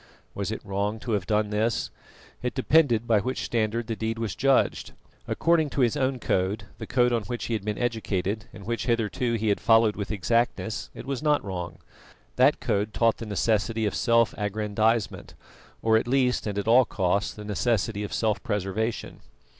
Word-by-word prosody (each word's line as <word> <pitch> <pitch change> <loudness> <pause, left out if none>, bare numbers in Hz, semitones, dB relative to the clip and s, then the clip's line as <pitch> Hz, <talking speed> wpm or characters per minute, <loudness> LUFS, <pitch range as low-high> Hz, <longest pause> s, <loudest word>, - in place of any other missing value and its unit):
Was - - -3
it - - -6
wrong 100 +3 -2
to 120 - -4
have 100 -4 -1
done 105 0 +1
this? 110 +2 0 0.5
It 125 - -3
depended 130 -4 +3
by 110 -3 +3
which 130 +6 -3
standard 115 0 -1
the 115 - -3
deed 110 +1 -3
was 115 -4 -2
judged. 135 +5 +1 0.3
According 165 -3 +2
to 140 - -1
his 120 -3 +3
own 130 0 0
code, 100 -2 -1 0.2
the - - -6
code 125 -1 +2
on 115 - +1
which 120 +5 -4
he 120 - -3
had 110 -3 -2
been 105 0 -2
educated 110 -4 -2
and 100 - -11
which 115 +3 -3
hitherto 115 +1 0
he 110 -1 0
had 100 - +1
followed 115 -2 +4
with 100 -2 -4
exactness, 110 +2 -1
it - - -8
was 135 -1 -3
not 150 -4 +2
wrong. 90 -3 -5 0.6
That 130 +4 +4
code 105 -2 -1
taught 115 -2 +3
the 115 - -7
necessity 110 +1 0
of 105 - -1
self 115 -1 +3
aggrandisement, 105 +2 -1 0.5
or 110 0 +4
at 115 - -1
least 125 -3 +1
and 100 -1 -3
at 100 - -2
all 120 +3 +7
costs 100 0 0
the 105 - -9
necessity 105 0 0
of 105 - -5
self 110 -1 0
preservation. 105 +1 -3
110 Hz, 185 wpm, -26 LUFS, 105-120 Hz, 0.6 s, all